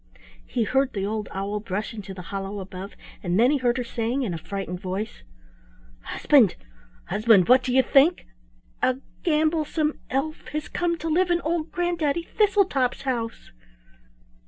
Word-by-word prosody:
He 240 - 0
heard 265 +4 +1
the 195 -2 -2
old 215 0 -3
owl 200 +2 -3
brush 205 0 -4
into 205 -3 -8
the 180 - -8
hollow 195 +1 -4
above, 190 +1 -8 0.3
and 180 +1 0
then 245 +4 +5
he 295 - +3
heard 245 0 +1
her 250 - -1
saying 235 +3 -2
in 200 -8 -2
a - - -3
frightened 185 0 -5
voice: 195 +4 -4 0.8
"Husband, 240 - +3 0.5
husband, 215 -4 +4
what 255 +2 +7
do 250 0 -2
you 260 +1 +5
think! 285 +8 +4 0.6
A 255 0 +2 0.2
gamblesome 310 -1 +1
elf 285 +4 -2
has 305 0 -3
come 345 -1 0
to 325 - -5
live 350 +3 +2
in 345 0 +3
old 325 0 -2
Granddaddy 340 -3 0
Thistletop's 380 - +1
house." 235 -4 -3
250 Hz, 160 wpm, -25 LUFS, 205-310 Hz, 0.8 s, what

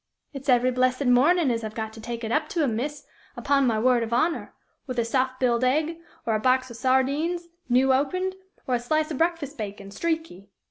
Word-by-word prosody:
"It's 275 0 -6
every 250 0 +4
blessed 255 +2 +1
mornin' 275 +5 +4
as 230 -1 -2
I've 215 0 -6
got 220 -1 -4
to 220 - -10
take 235 +1 -5
it 225 - -3
up 305 +3 0
to 330 - 0
'em, 240 -6 0
miss, 285 +5 -4 0.3
upon 275 -2 +2
my 225 -2 +1
word 245 +2 +3
of 230 0 -3
honor, 315 +8 0 0.3
with 255 -2 -5
a 235 - +1
soft 255 +2 0
biled 245 -1 +2
egg, 310 +6 +1 0.3
or 225 - +1
a 215 - +1
box 255 +1 +2
o' - - -7
sardines, 280 +8 0 0.2
new 260 +2 +4
opened, 365 +8 0 0.3
or 255 - -1
a 245 - +2
slice 310 +6 0
o' - - -2
breakfast 325 -3 -1
bacon, 200 -1 -6
streaky. 320 - -3
255 Hz, 215 wpm, -25 LUFS, 235-300 Hz, 0.3 s, every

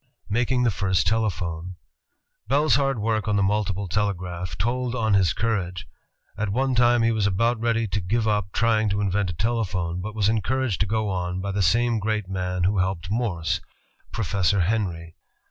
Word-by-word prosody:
Making 125 +3 +1
the 120 - +3
First 95 0 +1
Telephone 90 -5 -1 0.7
Bell's 145 +5 +3
hard 135 -2 +2
work 110 -1 -1
on 105 - +2
the 100 - +2
multiple 100 -1 0
telegraph 90 -3 -2
told 125 +4 -1
on 110 -4 +1
his 95 -5 +4
courage. 95 -3 -2 0.5
At 110 -1 -2
one 130 +5 0
time 120 -1 +4
he 115 - +3
was 110 -2 +1
about 115 +4 +1
ready 115 -1 +1
to 100 +2 -1
give 110 +5 0
up 105 -2 0
trying 110 -1 +2
to 100 +1 0
invent 100 -1 0
a - - -3
telephone, 90 -4 -1
but 105 +3 -6
was 105 -2 +2
encouraged 115 0 0
to 100 - +1
go 110 0 0
on 90 -1 -2
by 100 +1 -3
the 100 +1 -1
same 115 +5 +2
great 105 -1 -1
man 90 -1 -2
who 95 +2 +2
helped 90 -1 -1
Morse, 100 -9 -1 0.5
Professor 100 -2 +1
Henry. 85 -4 -2
105 Hz, 180 wpm, -24 LUFS, 90-115 Hz, 0.7 s, his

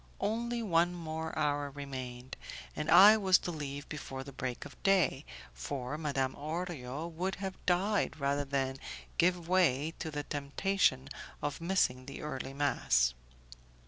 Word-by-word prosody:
Only 235 +3 -1
one 175 -3 +3
more 160 -1 -4
hour 145 -2 +1
remained, 130 -3 -6 0.4
and 150 - -3
I 210 +3 +9
was 190 -3 +5
to 175 - -4
leave 145 -2 -5
before 135 -3 -6
the 140 - -9
break 125 -1 -4
of 145 - -12
day, 195 -7 +3 0.3
for 125 - -4
Madame 140 -4 -1
Orio 155 -2 -4
would 175 +3 -2
have 190 -1 -6
died 185 0 +2
rather 140 +1 +1
than 135 -1 -1 0.4
give 175 -1 +3
way 165 -4 +3
to 160 - -3
the 145 -1 -3
temptation 145 -1 +1 0.3
of 145 +2 -3
missing 155 -8 +1
the 140 - -7
early 135 -3 -4
mass. - - +2
150 Hz, 145 wpm, -32 LUFS, 135-180 Hz, 0.4 s, I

